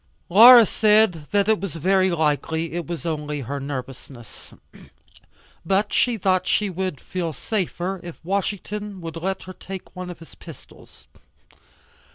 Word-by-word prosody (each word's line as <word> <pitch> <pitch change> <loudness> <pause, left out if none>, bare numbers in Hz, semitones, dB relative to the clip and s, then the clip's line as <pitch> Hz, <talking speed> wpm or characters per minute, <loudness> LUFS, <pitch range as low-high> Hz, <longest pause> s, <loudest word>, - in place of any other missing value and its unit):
Laura 230 +5 +9
said 210 -8 +2
that 205 -1 +2
very 190 -2 +1
likely 160 0 -1
it 175 -1 -4
was 170 -1 -6
only 150 -3 -3
her 140 +3 -5
nervousness. 130 -3 -9 1.1
But 195 +4 0
she 240 -2 +2
thought 185 -2 +1
she 205 -2 +1
would 185 -5 -4
feel 170 -3 -4
safer 190 - -3
if 170 -2 -10
Washington 200 +1 -3
would 165 -1 -7
let 190 +3 -3
her 185 - -9
take 190 0 -10
one 180 0 -6
of 175 - -8
his 165 - -15
pistols. - - -15
180 Hz, 135 wpm, -22 LUFS, 160-195 Hz, 1.1 s, Laura